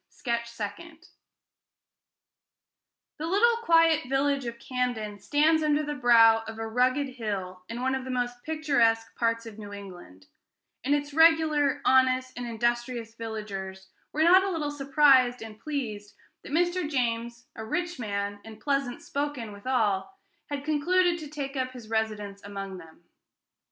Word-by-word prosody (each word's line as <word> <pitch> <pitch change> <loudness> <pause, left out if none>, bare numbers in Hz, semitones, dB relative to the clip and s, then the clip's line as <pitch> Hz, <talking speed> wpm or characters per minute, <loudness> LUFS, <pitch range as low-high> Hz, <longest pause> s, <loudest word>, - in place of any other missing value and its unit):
SKETCH 235 -2 -3
SECOND 280 - -8 2.1
The 315 - -3
little 455 +6 +3
quiet 330 - +3
village 275 -1 +1
of 235 0 -5
Camden 235 -5 -3
stands 305 +8 +3
under 305 0 +2
the 295 0 -3
brow 230 -4 +6
of 225 0 -7
a 225 - -4
rugged 255 +5 +1
hill 200 -8 -5
in 235 +2 -4
one 260 0 +1
of 265 -1 -2
the 260 - -8
most 245 -1 -2
picturesque 275 -8 +1
parts 230 0 0
of 220 -1 -10
New 205 -1 -8
England; 180 - -11 0.6
and 280 +3 +2
its 290 0 -3
regular, 310 -3 +4
honest, 255 0 +3
and 245 -1 -5
industrious 235 0 -2
villagers 200 -4 -6 0.2
were 310 - +1
not 365 +3 +7
a 390 - -1
little 310 -5 -2
surprised 275 -4 +4
and 215 -1 -10
pleased 220 -9 -5 0.3
that - - -11
Mr. 350 0 +1
James, 235 -3 -2
a 220 - -6
rich 350 +7 -3
man, 205 -2 -3
and 220 -1 -11
pleasant 275 -2 -1
spoken 280 -6 -3
withal, 220 - -1 0.3
had 285 -1 -4
concluded 345 +4 +2
to 310 - -7
take 285 -1 -5
up 255 -1 -2
his 230 -3 -11
residence 210 -3 -2
among 195 -2 -6
them. 165 0 -16
250 Hz, 150 wpm, -27 LUFS, 220-290 Hz, 2.1 s, not